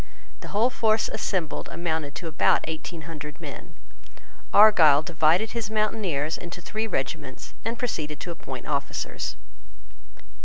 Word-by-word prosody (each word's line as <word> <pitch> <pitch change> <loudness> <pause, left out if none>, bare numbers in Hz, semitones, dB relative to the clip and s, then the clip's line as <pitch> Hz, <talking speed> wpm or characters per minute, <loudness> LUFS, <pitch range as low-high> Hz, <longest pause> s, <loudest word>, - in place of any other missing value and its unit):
The - - -9
whole 225 +5 +2
force 220 -2 +2
assembled 175 -6 -2
amounted 160 -4 -2
to 165 +2 -5
about 155 - +3
eighteen 160 +1 -5
hundred 150 -1 -8
men. - - -9 0.8
Argyle 165 -9 +7
divided 165 +6 +2
his 230 -3 -3
mountaineers 205 -9 0
into 175 0 -7
three 215 +5 -3
regiments, 135 -5 -4
and 230 +2 -2
proceeded 155 - -3
to 175 - -5
appoint 130 -6 -7
officers. 140 -2 -2
165 Hz, 125 wpm, -26 LUFS, 150-215 Hz, 0.8 s, Argyle